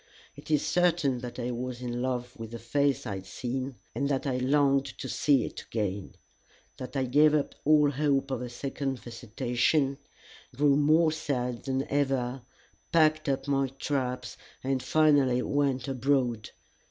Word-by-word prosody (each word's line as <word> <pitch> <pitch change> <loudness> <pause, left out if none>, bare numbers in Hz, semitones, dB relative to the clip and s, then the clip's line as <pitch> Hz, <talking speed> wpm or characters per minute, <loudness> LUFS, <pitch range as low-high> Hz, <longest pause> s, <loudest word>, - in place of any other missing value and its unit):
It - - -13
is 150 -2 +2
certain 170 -7 +2
that 120 -1 -7
I 125 0 -2
was 125 0 -4
in 120 -1 -4
love 125 -1 -3
with 115 -1 -7
the 115 - -6
face 140 +5 0
I 100 -4 -3
had 95 - -10
seen, 130 +1 -4 0.2
and 140 0 -1
that 135 0 -1
I 130 -2 0
longed 140 +1 +3
to - - -5
see 140 -6 +2
it - - -7
again; 100 -3 -4 0.6
that 130 +1 -8
I 135 - +1
gave 150 +4 +4
up 145 - 0
all 150 -1 +5
hope 140 -1 0
of 130 -2 -2
a 125 - -5
second 135 +2 -3
visitation, 125 +4 -1 0.6
grew 140 +1 +4
more 155 +3 +4
sad 125 -6 -3
than 135 0 -1
ever, 135 -2 0 0.5
packed 155 -2 +3
up 135 0 -1
my 135 -1 +2
traps, 130 -2 -3 0.3
and 135 0 0
finally 140 -3 +3
went 140 -3 0
abroad. 125 -4 0
135 Hz, 160 wpm, -28 LUFS, 125-145 Hz, 0.6 s, all